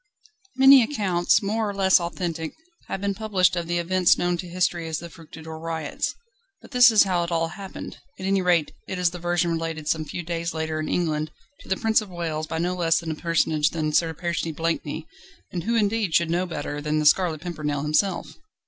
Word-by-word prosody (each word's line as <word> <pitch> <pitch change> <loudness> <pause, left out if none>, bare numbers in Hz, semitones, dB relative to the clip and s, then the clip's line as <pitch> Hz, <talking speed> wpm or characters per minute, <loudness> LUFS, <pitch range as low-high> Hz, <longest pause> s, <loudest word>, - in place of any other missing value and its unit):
Many 270 0 +8
accounts, 205 -6 +1
more 215 +1 0
or 200 - -5
less 190 -1 +5
authentic, 170 -2 -4 0.3
have 195 - -4
been 200 0 0
published 195 -4 +1
of 170 -1 -3
the 175 0 0
events 180 +1 +3
known 175 0 0
to 180 - -6
history 175 -1 -1
as 160 -1 -2
the 170 0 -8
"Fructidor 160 -1 -10
Riots." 160 -2 -3 0.4
But - - -16
this 250 -1 +7
is 220 -2 +6
how 185 -3 0
it 170 - -4
all 165 -1 0
happened: 190 +3 -8 0.2
at 190 - -6
any 195 0 +2
rate 175 -4 +2 0.2
it 190 - -4
is 180 -2 +2
the 180 - -7
version 175 0 0
related 165 -2 -3
some 155 0 +1
few 175 +4 -5
days 170 0 -3
later 160 0 -2
in 155 - -3
England 155 -3 0 0.3
to - - -15
the 190 - +1
Prince 220 0 +2
of 210 - -9
Wales 160 -3 -3
by 160 - -3
no 175 +2 0
less 170 -2 +1
a 160 -1 -3
personage 155 -2 +1
than 155 -2 -2
Sir 165 +1 +3
Percy 170 0 -2
Blakeney; 160 -1 -3 0.5
and 175 -1 -4
who 235 +1 +1
indeed 210 -4 +1
should 170 -1 +3
know 180 +2 0
better 145 -3 -4
than 150 +1 -1
The 155 - 0
Scarlet 160 0 +3
Pimpernel 150 -5 -3
himself? 170 +5 0
170 Hz, 210 wpm, -24 LUFS, 160-185 Hz, 0.5 s, Many